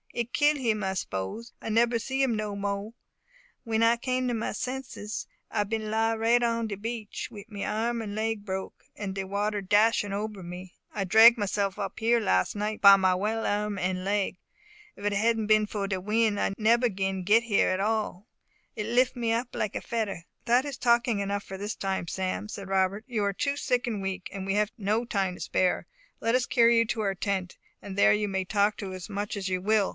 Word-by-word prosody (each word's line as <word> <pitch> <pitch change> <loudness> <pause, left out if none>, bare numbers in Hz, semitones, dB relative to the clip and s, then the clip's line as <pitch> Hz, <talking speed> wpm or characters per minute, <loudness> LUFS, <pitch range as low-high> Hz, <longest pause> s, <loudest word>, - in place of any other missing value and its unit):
It 240 0 -3
kill 295 0 +3
him 220 -6 0
I 190 0 -1
s'pose 100 - -4
I - - -5
nebber 230 +2 +3
see 265 +4 -2
him 255 -4 +2
no 210 -1 -3
mo'e. 200 +1 -3 0.7
W'en 225 -1 0
I 230 +1 +5
come 255 +1 -1
to 245 - 0
my 225 -1 -2
senses, 250 -2 -5 0.2
I 210 - 0
bin 215 +1 -3
lie 225 +1 +1
right 230 +2 +3
on 230 -1 0
de 205 - -4
beach, 220 +1 -5
wi' 205 -2 -10
my 205 -3 -6
arm 230 +2 -1
and 210 -2 -5
leg 220 0 -2
broke, 190 -1 -5
and 195 -2 -5
de 195 - -2
water 205 +2 -1
dashin' 205 +1 +3
ober 205 -1 -4
me. 180 +1 -8 0.2
I 200 -2 -2
drag 225 +5 +8
myself 200 -1 -1
up 200 - -4
here 235 +1 +3
las' 95 - +1
night, 210 +1 -3
by 200 -1 +9
my 185 -1 +3
well 215 +4 -1
arm 205 0 -1
and 185 0 -1
leg; 200 -1 0 0.6
but 200 - -9
if 205 - +1
it - - +1
hadn't 225 0 +1
bin 215 0 +4
for 205 -1 -3
de 190 -2 -2
win' 215 +1 +1
I 195 - 0
nebber 235 +3 +3
bin 190 -1 -2
git 215 +5 +4
here 225 -4 +2
at 185 - 0
all 215 -1 -1 0.5
it 210 -1 -3
lif' 245 +3 +2
me 235 -2 -1
up 235 +2 0
like 210 - -2
a - - -5
fedder." 210 -7 -3 0.2
"That 245 +3 +3
is 280 -3 -5
talking 235 -3 +2
enough 200 0 -2
for 190 - -8
this 205 +2 -4
time, 190 -3 -2
Sam," 190 +2 -3
said 200 -2 -7
Robert; 195 +3 0
"you 225 -5 -1
are 200 0 +1
too 280 +8 -1
sick 250 -3 0
and 215 -4 -2
weak, 190 -1 -4
and 195 -1 -5
we 195 +1 0
have 210 0 +1
no 215 +3 0
time 195 -5 -1
to - - -13
spare. 185 -1 0 0.3
Let 230 +2 +1
us 255 -1 +1
carry 235 -1 +5
you 230 - +3
to 220 +1 -1
our 195 -2 0
tent, 190 -1 -2 0.2
and 200 -2 -7
there - - +6
you 210 0 0
may 190 -1 -1
talk 205 +3 +1
as 185 0 -6
much 205 0 -3
as 195 -1 -3
you 185 -1 -1
will. 210 0 +2
210 Hz, 220 wpm, -28 LUFS, 195-230 Hz, 0.7 s, by